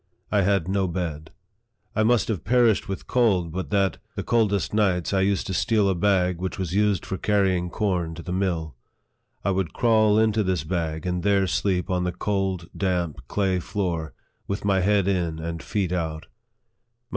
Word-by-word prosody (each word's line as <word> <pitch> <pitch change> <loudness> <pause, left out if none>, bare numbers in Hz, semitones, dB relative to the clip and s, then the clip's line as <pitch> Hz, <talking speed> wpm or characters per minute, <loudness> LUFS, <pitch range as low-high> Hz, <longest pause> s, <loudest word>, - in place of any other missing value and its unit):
I 105 - +3
'had 100 -3 +1
no 95 0 +1
bed. 80 -4 -4 0.7
I 110 - +2
must 110 -1 +3
have 100 -8 -2
perished 115 -3 +3
with 95 - -4
cold, 100 -9 +2
but 95 +3 -4
that, 100 -2 +1 0.2
the - - -3
coldest 105 -6 +1
nights, 95 -4 +1
I 95 - +3
used 100 0 +1
to 95 - -3
steal 105 +1 +2
a 95 - +2
bag 90 -1 +1
which 95 0 -3
was 90 -3 -3
used 105 -2 +2
for 95 - -4
carrying 95 -4 +1
corn 90 -5 -1
to. 85 - -8
the 90 - -6
mill. 85 -6 -1 0.7
I 100 - +2
would 95 -4 -1
crawl 110 -3 +3
into 110 -1 +3
this 95 -5 0
bag, 80 -1 -3
and 90 -1 -1
there 100 0 +3
sleep 95 0 0
on 90 -1 +1
the 90 - 0
cold, 95 -1 -2
damp, 90 -6 -1
clay 95 +1 0
floor, 85 -7 -3 0.3
with 100 +1 -3
my 100 -2 +3
head 100 0 +2
in 85 -5 0
and 80 0 -5
feet 95 -4 -2
out. 80 -3 -3
95 Hz, 180 wpm, -24 LUFS, 85-100 Hz, 0.7 s, I